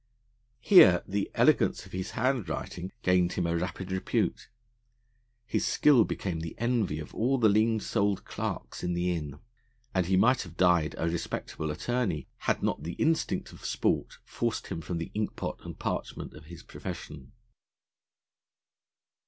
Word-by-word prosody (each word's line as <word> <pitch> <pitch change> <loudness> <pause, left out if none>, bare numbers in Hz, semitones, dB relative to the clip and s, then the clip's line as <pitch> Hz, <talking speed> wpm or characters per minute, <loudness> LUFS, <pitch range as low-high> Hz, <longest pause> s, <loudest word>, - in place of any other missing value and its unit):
Here 95 - +7
the 100 0 -1
elegance - - +3
of - - -15
his 95 +1 -4
handwriting 100 - -2
gained 90 -1 +3
him 90 - -1
a 85 0 0
rapid 90 +2 -3
repute; 95 0 -1 1.0
his 125 - -1
skill 135 -7 +5
became 90 -4 -3
the 80 0 -6
envy 115 -9 0
of 75 -1 -8
all 130 +4 +1
the 115 -3 +4
lean 110 +2 +3
souled 100 -2 0
clerks - - -5
in 90 -1 -1
the 90 +1 0
Inn, 75 -4 -5 0.6
and 95 -3 +1
he 95 0 +3
might 125 +6 +4
have 85 -2 -10
died 90 -4 +3
a 85 - 0
respectable 80 -1 -3
attorney 100 0 -1
had - - -1
not - - 0
the 85 - -5
instinct 160 0 0
of - - -14
sport - - 0
forced 115 -2 -2
him 85 -4 -4
from 85 +1 -4
the 85 - -5
inkpot 105 -1 -3
and - - -8
parchment - - -4
of 75 0 -13
his 85 0 -11
profession. 70 -4 -8
90 Hz, 155 wpm, -29 LUFS, 85-110 Hz, 1.0 s, Here